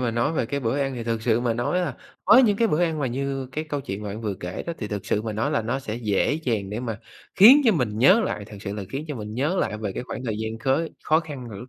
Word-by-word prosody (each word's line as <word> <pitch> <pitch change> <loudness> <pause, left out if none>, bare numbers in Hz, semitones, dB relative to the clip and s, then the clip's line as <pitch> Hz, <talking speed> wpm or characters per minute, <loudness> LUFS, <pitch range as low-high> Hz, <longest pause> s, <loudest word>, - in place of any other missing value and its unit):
mà 125 -2 0
nói 120 +6 0
về 140 -7 0
cái 140 +4 -2
bữa 125 +3 -1
ăn 135 -1 -1
thì 120 -2 -5
thực 115 -1 -2
sự 115 0 +2
mà 120 -2 0
nói 120 +10 0
là, 180 - -2 0.3
có 255 - +7
những 215 -6 +5
cái 230 +1 +2
bữa 160 -1 +1
ăn 165 -3 0
mà 140 - 0
như 135 +1 -3
cái 155 +3 -3
câu 145 -2 -3
chuyện 100 -5 -6
bạn 105 +1 -5
vừa 105 -3 -2
kể 90 0 -6
đó, 170 - -2
thì 105 - -4
thực 105 -2 -5
sự 105 - 0
mà 110 -1 -3
nói 110 +7 -1
là 145 -7 0
nó 120 +5 -1
sẽ 110 -5 -5
dễ 110 0 0
dàng 115 -11 -2
để 105 +3 -3
mà 115 -4 -4 0.4
khiến 240 +10 +9
cho 230 - +5
mình 120 - -1
nhớ 185 - +6
lại 105 - -3
thực 105 0 -11
sự 100 -1 -4
là 105 - -4
khiến 140 +3 -4
cho 150 - -3
mình 105 -1 -6
nhớ 150 +9 0
lại 105 - 0
về 105 -3 -3
cái - - -4
khoảng 125 0 -7
thời 110 -3 -2
gian 110 0 -4
khớ 135 +8 +1 0.2
khó 155 +1 +3
khăn 145 -6 -8
hồi 105 -3 -8
lúc 120 - -10
120 Hz, 315 wpm, -24 LUFS, 110-150 Hz, 0.4 s, khiến